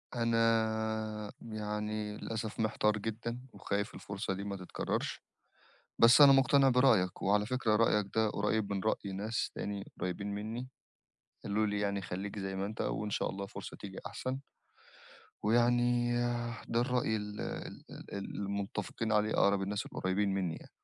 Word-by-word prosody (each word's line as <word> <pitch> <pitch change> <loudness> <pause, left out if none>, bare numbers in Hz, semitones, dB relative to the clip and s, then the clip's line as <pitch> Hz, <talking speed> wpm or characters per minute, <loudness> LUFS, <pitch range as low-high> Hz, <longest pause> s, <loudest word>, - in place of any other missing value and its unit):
أنا 110 -2 +1
يعني 105 -1 -3
للأسف 110 0 -4
محتار 105 -1 +2
جدًا، 115 +3 -4
وخايف 100 +1 -2
الفرصة 100 0 -3
دي 100 - -4
ما 100 -1 -3
تتكرّرش 90 -1 -3 0.8
بس 120 +5 +8
أنا 140 - +11
مقتنع 135 0 +6
برأيك، 120 -8 +4
وعلى 105 +1 +3
فكرة 120 -3 +1
رأيك 105 -2 +3
ده 110 -1 +3
قريّب 105 0 0
من 95 - -1
رأي 100 -2 0
ناس 105 +4 -2
تاني 100 -1 -4
قريبين 90 +2 -2
منّي 115 +4 -4 0.8
قالوا 105 +1 +1
لي 105 0 -1
يعني 100 -1 0
خلّيك 95 +4 -4
زي 95 -1 -3
ما 95 +1 -1
أنت 110 +2 -6
وإن 105 0 -1
شاء - - 0
الله 100 0 -5
فرصة - - -8
تيجي 95 -2 -8
أحسن. 130 +6 -3 1.1
ويعني 120 +2 +3 0.5
ده 115 - +2
الرأي 125 -3 +1
ال 105 -1 -4 0.5
ال - - -10
المتّفقين 100 +2 -3
عليه 105 0 +3
أقرَب 100 -1 +3
الناس 100 +2 -2
القريّبين 95 +1 0
منّي 90 -4 -1
يعني. - - -12
105 Hz, 145 wpm, -33 LUFS, 100-115 Hz, 1.1 s, أنا